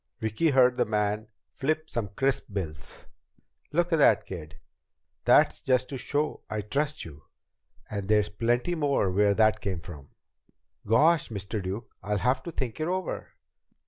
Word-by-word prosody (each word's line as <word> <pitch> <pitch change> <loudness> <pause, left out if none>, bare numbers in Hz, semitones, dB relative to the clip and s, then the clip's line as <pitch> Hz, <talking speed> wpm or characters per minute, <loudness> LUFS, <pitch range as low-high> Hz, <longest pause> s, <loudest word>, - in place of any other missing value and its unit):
Vicki 110 +8 0
heard 125 -2 +4
the - - +3
man 105 0 -1 0.3
flip 155 +3 -1
some 115 -7 -3
crisp 135 +7 0
bills. 80 -6 -5 0.7
"Look 175 +2 +1
at - - +4
that, 115 -7 +5
kid. 80 -5 -8 0.7
That's - - +5
just 130 -1 +1
to 135 - -4
show 145 +4 -1
I 110 0 -2
trust 140 +8 -2
you. 75 -3 -12 0.6
And 100 -2 -4
there's 105 0 +3
plenty 120 +9 0
more 140 - +1
where 100 +1 +3
that 110 0 +3
came 95 -3 -2
from!" 75 -5 -11 0.8
"Gosh, 155 +9 +4
Mr. 100 0 -3
Duke, 95 +5 -6
I'll 105 +1 -1
have 125 +5 +1
to 170 - -6
think 130 -6 -4
it 155 - -1
over." 185 -1 -3
110 Hz, 155 wpm, -28 LUFS, 100-140 Hz, 0.8 s, that